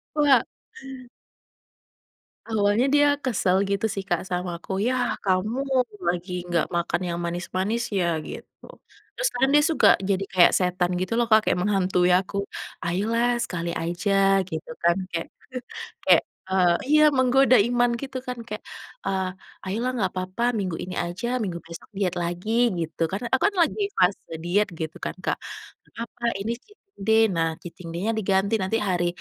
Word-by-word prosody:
Wah. 285 Hz, -5 st, +4 dB, 2.0 s
Awalnya 210 Hz, +3 st, +2 dB
dia 290 Hz, 0 st, +5 dB, 0.2 s
kesel 195 Hz, -7 st, +1 dB
gitu 200 Hz, +2 st, 0 dB
sih 195 Hz, -1 st, -4 dB
Kak 175 Hz, -, +1 dB
sama 180 Hz, 0 st, -2 dB
aku, 190 Hz, +1 st, -4 dB
"Yah 250 Hz, -1 st, 0 dB
kamu 210 Hz, +8 st, 0 dB, 0.4 s
lagi 175 Hz, +1 st, -1 dB, 0.2 s
gak 170 Hz, -, +1 dB
makan 170 Hz, +1 st, 0 dB
yang 170 Hz, -, -2 dB
manis-manis 185 Hz, +7 st, -2 dB
ya?" 190 Hz, -4 st, 0 dB, 0.2 s
gitu. -, -, -10 dB, 0.5 s
Terus -, -, +1 dB
kan 265 Hz, +2 st, +3 dB
dia 295 Hz, 0 st, +6 dB
suka 320 Hz, -, +4 dB, 0.2 s
jadi 195 Hz, 0 st, +1 dB
kayak 180 Hz, -2 st, +6 dB
setan 180 Hz, -1 st, +1 dB
gitu 185 Hz, +4 st, -2 dB
loh 240 Hz, -, +3 dB
Kak, 220 Hz, -, +8 dB
kayak -, -, +2 dB
menghantui 180 Hz, -2 st, +2 dB
aku, 190 Hz, +2 st, +1 dB, 0.5 s
"Ayolah 230 Hz, +7 st, +1 dB
sekali 170 Hz, -1 st, -3 dB
aja," 195 Hz, +2 st, +2 dB
gitu 160 Hz, -1 st, -6 dB
kan 170 Hz, 0 st, +5 dB, 0.2 s
kayak 165 Hz, -1 st, -3 dB, 0.8 s
kayak, -, -, +7 dB, 0.3 s
eee, 180 Hz, -2 st, +3 dB
iya 305 Hz, +1 st, +5 dB
menggoda 260 Hz, 0 st, +5 dB
iman 245 Hz, 0 st, +2 dB
gitu 265 Hz, -1 st, -6 dB
kan 250 Hz, -1 st, -4 dB
kayak, 210 Hz, -, -6 dB, 0.4 s
eee, 190 Hz, -1 st, 0 dB, 0.4 s
"Ayolah 225 Hz, +7 st, -1 dB
nggak 190 Hz, -2 st, +1 dB
apa-apa 185 Hz, +5 st, -4 dB
minggu 185 Hz, -5 st, -2 dB
ini 180 Hz, -, -6 dB
aja, 235 Hz, +9 st, -3 dB
minggu 175 Hz, -5 st, -3 dB
besok 165 Hz, 0 st, -11 dB
diet 195 Hz, -3 st, -1 dB
lagi," 200 Hz, +7 st, 0 dB
gitu. 165 Hz, +1 st, -4 dB
Karena 220 Hz, +5 st, -3 dB
aku 260 Hz, -, +1 dB
kan -, -, -12 dB
lagi 340 Hz, +6 st, +2 dB
fase 180 Hz, -2 st, +1 dB
diet 185 Hz, +3 st, +1 dB
gitu 160 Hz, -1 st, -5 dB
kan -, -, -2 dB
Kak, -, -, -1 dB, 0.5 s
"Gak -, -, -28 dB
papa 235 Hz, +1 st, -7 dB, 0.2 s
ini 230 Hz, +4 st, -2 dB
cheating 415 Hz, -, -24 dB, 0.2 s
day, 220 Hz, +3 st, +4 dB
nah 165 Hz, -1 st, +1 dB
cheating 175 Hz, 0 st, -10 dB
day-nya 215 Hz, +6 st, 0 dB
diganti, 195 Hz, +1 st, +1 dB
nanti 190 Hz, +4 st, 0 dB
hari 175 Hz, -1 st, +1 dB
195 Hz, 160 wpm, -25 LUFS, 180-235 Hz, 2.0 s, Kak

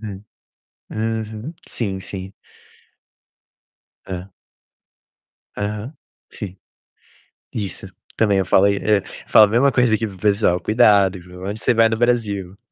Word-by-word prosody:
Hum, 105 Hz, -2 st, -8 dB, 0.7 s
uhum. 110 Hz, +5 st, -3 dB
Sim, 95 Hz, -5 st, -3 dB
sim. 95 Hz, +1 st, -8 dB, 1.7 s
Hã. 95 Hz, +1 st, -7 dB, 1.3 s
Aham, 105 Hz, +6 st, -4 dB, 0.4 s
sim. 95 Hz, -2 st, -8 dB, 1.0 s
Isso, 100 Hz, -2 st, -4 dB, 0.3 s
também 100 Hz, -3 st, +3 dB
eu 95 Hz, -, 0 dB
falo 95 Hz, +1 st, +4 dB
aí, 100 Hz, 0 st, +3 dB
eh, 105 Hz, -1 st, +2 dB, 0.3 s
falo 110 Hz, -, +8 dB
a -, -, -2 dB
mesma 120 Hz, +6 st, +3 dB
coisa 125 Hz, -3 st, +3 dB
aqui 110 Hz, +1 st, -2 dB
para 95 Hz, -, -10 dB
o -, -, -16 dB
pessoal: 100 Hz, -3 st, +2 dB
"Cuidado, 100 Hz, -3 st, +4 dB
viu, 90 Hz, +1 st, -11 dB
aonde 105 Hz, +2 st, -4 dB
você -, -, +2 dB
vai 115 Hz, 0 st, +4 dB
no 110 Hz, -, -1 dB
Brasil?" 105 Hz, -6 st, 0 dB
105 Hz, 130 wpm, -21 LUFS, 95-110 Hz, 1.7 s, falo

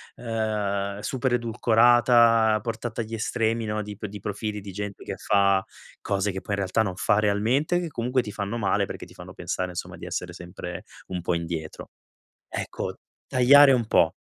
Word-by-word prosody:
ehm, 105 Hz, -3 st, -2 dB
super 130 Hz, +2 st, -1 dB
edulcorata, 115 Hz, -1 st, +4 dB
portata 115 Hz, 0 st, -4 dB
agli 110 Hz, 0 st, -7 dB
estremi 115 Hz, 0 st, 0 dB
no, 105 Hz, 0 st, -2 dB
di 105 Hz, 0 st, -7 dB
p 105 Hz, +1 st, -6 dB
di 105 Hz, +1 st, -8 dB
profili 105 Hz, +2 st, -4 dB
di 100 Hz, 0 st, -9 dB
gente 100 Hz, +1 st, -6 dB
che -, -, -4 dB
fa 100 Hz, -2 st, +3 dB, 0.4 s
cose 100 Hz, 0 st, 0 dB
che 95 Hz, 0 st, -5 dB
poi 105 Hz, -, -4 dB
in -, -, -8 dB
realtà 100 Hz, +3 st, +1 dB
non 95 Hz, -4 st, -2 dB
fa 105 Hz, +2 st, +2 dB
realmente, 115 Hz, +11 st, +1 dB
che 175 Hz, -, -3 dB
comunque 125 Hz, -1 st, 0 dB
ti 105 Hz, -, -6 dB
fanno 100 Hz, +3 st, -3 dB
male, 100 Hz, -4 st, +1 dB
perché -, -, -7 dB
ti -, -, -16 dB
fanno -, -, -11 dB
pensare, 90 Hz, 0 st, -3 dB
insomma, 90 Hz, -, -6 dB
di -, -, -9 dB
essere 90 Hz, -1 st, -4 dB
sempre 90 Hz, 0 st, -8 dB, 0.2 s
un 90 Hz, -1 st, -4 dB
po' 85 Hz, -, 0 dB
indietro. 85 Hz, -2 st, -5 dB, 0.6 s
Ecco, -, -, -4 dB, 0.3 s
tagliare 135 Hz, +3 st, +7 dB
un 120 Hz, -3 st, +1 dB
po' -, -, +3 dB
105 Hz, 180 wpm, -25 LUFS, 100-115 Hz, 0.6 s, tagliare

